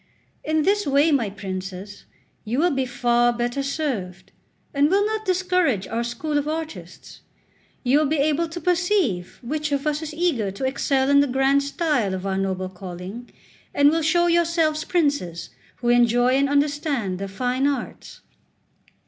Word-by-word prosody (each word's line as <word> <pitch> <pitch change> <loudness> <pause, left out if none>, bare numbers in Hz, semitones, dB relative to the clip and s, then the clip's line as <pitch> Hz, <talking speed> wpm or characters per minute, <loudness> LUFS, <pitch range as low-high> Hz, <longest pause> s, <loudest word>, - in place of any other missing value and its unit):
In 310 0 +1
this 410 +1 +1
way, 285 +3 +3
my 245 -8 +1
princes, 190 0 -7 0.4
you 230 +3 -3
will 345 +5 +3
be 265 -2 -1
far 240 0 +2
better 240 +3 -2
served, 270 - -4 0.4
and 285 +1 +3
will 400 +3 +3
not 435 0 -3
discourage 360 - +1
our 230 +1 -2
school 290 +6 -2
of 290 - -4
artists; 320 0 -7 0.6
you 265 +3 +3
will 305 - +2
be 310 +2 0
able 310 +3 +1
to 340 +2 -6
perceive 350 - 0
which 300 +4 -3
of 280 +1 -1
us 300 0 0
is 315 -1 -5
eager 310 - 0
to 200 +7 -4
excel 265 0 +1
in 280 - +6
the 285 - +3
grand 270 +2 +2
style 280 - 0
of 185 +1 -6
our 195 -1 -1
noble 190 -1 -2
calling, 185 +5 -8 0.5
and 285 +1 +5
will 325 +1 +1
show 345 +3 +2
yourselves 335 -2 +2
princes 285 - -1 0.2
who 240 - -2
enjoy 240 0 +4
and 275 +2 +2
understand 285 - 0
the 195 - -4
fine 250 +7 -1
arts." 280 -3 -5
275 Hz, 165 wpm, -23 LUFS, 230-310 Hz, 0.6 s, in